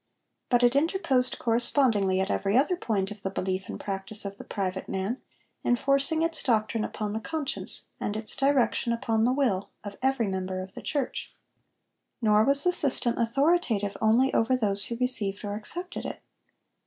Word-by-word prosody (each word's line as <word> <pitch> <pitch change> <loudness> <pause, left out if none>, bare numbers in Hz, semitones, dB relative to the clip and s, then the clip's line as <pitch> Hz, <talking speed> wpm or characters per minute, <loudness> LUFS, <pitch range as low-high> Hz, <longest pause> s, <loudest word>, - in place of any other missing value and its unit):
But 245 -1 +3
it 245 +2 +4
interposed 280 -5 +1
correspondingly 230 -5 +2
at 190 +1 0
every 200 +3 +1
other 300 +7 +3
point 210 - -2
of 210 -1 -9
the 190 - -2
belief 190 0 -3
and - - -6
practice 200 +2 -3
of 200 0 -6
the - - -7
private 190 -1 -4
man, 195 +7 -3 0.4
enforcing 275 +6 +2
its 330 0 +1
doctrine 220 -3 +1
upon 210 -1 -4
the 220 - -2
conscience, 300 +3 -1
and 210 - -2
its 220 0 -3
direction 270 -4 +2
upon 225 -1 0
the 245 - +3
will, 245 -8 0
of 205 -1 -8
every 265 -4 +1
member 185 -1 -3
of 185 +1 -7
the - - -8
church. 280 -4 -3 0.8
Nor 215 -2 +4
was 280 +1 +4
the 360 - +2
system 255 -6 +1
authoritative 235 - +1
only 235 +5 +3
over 255 +3 +2
those 200 -4 +1
who 235 - -4
received 225 -5 +3
or 205 - -3
accepted 350 - -6
it. - - -8
230 Hz, 170 wpm, -27 LUFS, 200-270 Hz, 0.8 s, it